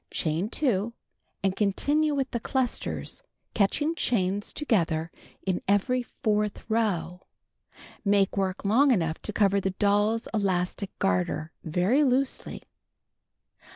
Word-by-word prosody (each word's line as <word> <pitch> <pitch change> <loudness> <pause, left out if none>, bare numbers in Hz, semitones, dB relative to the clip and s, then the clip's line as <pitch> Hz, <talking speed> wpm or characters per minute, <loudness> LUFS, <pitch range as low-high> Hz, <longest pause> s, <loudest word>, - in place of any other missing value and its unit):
Chain 165 +6 -1
2 235 -5 0 0.5
and 190 -1 +1
continue 290 +10 +1
with 270 -2 -1
the 235 - -1
clusters, 260 - -2 0.3
catching 295 +10 +1
chains 205 - 0
together 165 - 0 0.3
in 185 -2 0
every 205 +6 +2
fourth 210 -3 -2
row. 195 -6 -1 0.8
Make 200 -2 +2
work 190 -1 -1
long 250 +8 +4
enough 165 -9 +1
to - - -4
cover 200 -1 +2
the 195 - 0
doll's 205 +3 +1
elastic 195 -2 0
garter 95 - 0
very 185 - +2
loosely. 265 0 0
205 Hz, 115 wpm, -27 LUFS, 185-240 Hz, 0.8 s, long